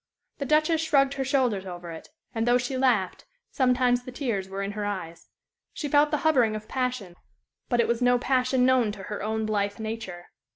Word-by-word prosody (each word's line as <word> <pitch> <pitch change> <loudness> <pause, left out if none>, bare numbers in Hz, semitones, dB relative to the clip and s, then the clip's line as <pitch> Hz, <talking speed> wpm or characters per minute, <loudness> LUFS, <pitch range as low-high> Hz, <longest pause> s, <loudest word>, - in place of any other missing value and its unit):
The 280 - -3
Duchess 310 +2 +3
shrugged 280 -4 +3
her 270 - -2
shoulders 255 -8 0
over 175 -1 -7
it, 160 - -10 0.2
and, 225 +1 -1
though 245 0 +5
she 250 +2 -3
laughed, 240 -8 +1 0.3
sometimes 250 -1 +2
the 255 - -9
tears 230 -8 -3
were 195 +1 -4
in 200 - -3
her 210 0 -4
eyes. 185 -5 -5 0.4
She 300 - -4
felt 290 +1 +4
the 300 - 0
hovering 250 -9 +3
of 215 0 -7
passion, 250 -8 -3 0.5
but 240 - +1
it 235 - +3
was 235 +1 0
no 245 0 +4
passion 255 0 +1
known 255 -4 +3
to 195 - -9
her 210 +2 -5
own 220 +1 -2
blithe 205 -1 -1
nature. 220 -6 -6
240 Hz, 200 wpm, -26 LUFS, 205-260 Hz, 0.5 s, though